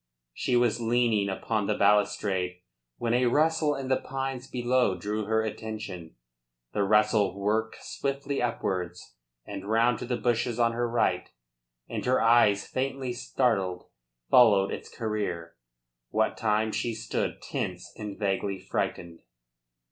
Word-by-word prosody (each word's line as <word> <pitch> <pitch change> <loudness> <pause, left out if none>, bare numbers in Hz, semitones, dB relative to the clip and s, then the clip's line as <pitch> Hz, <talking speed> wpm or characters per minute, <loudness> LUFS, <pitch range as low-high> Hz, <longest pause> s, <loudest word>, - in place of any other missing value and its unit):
She 125 - 0
was 120 -1 +2
leaning 115 -3 +2
upon 105 +1 -1
the 105 - 0
balustrade 100 -3 +2 0.4
when 115 0 -1
a 125 +1 +3
rustle 155 +3 +2
in 135 -1 -5
the 130 0 +1
pines 135 -1 -4
below 125 -5 +1
drew 105 +3 -3
her 110 +1 +1
attention. 105 - -6 0.6
The - - 0
rustle 105 -1 +3
worked 110 +3 -1
swiftly 140 0 -3
upwards 90 - -3 0.3
and 100 0 -7
round 115 +1 +3
to - - -5
the 125 -1 -1
bushes 120 -1 0
on 115 -1 +3
her 120 +1 -1
right, 120 0 +1 0.6
and - - -4
her 130 - +4
eyes, 115 -3 +4
faintly 130 -1 -2
startled, 110 -8 0 0.5
followed 105 -6 +6
its - - -6
career, 100 -7 -3 0.5
what 110 0 +1
time 110 0 +1
she 110 +2 -2
stood 110 - -2
tense - - -5
and 105 -2 -6
vaguely 100 -1 -1
frightened. 85 -2 -3
110 Hz, 135 wpm, -28 LUFS, 100-120 Hz, 0.6 s, followed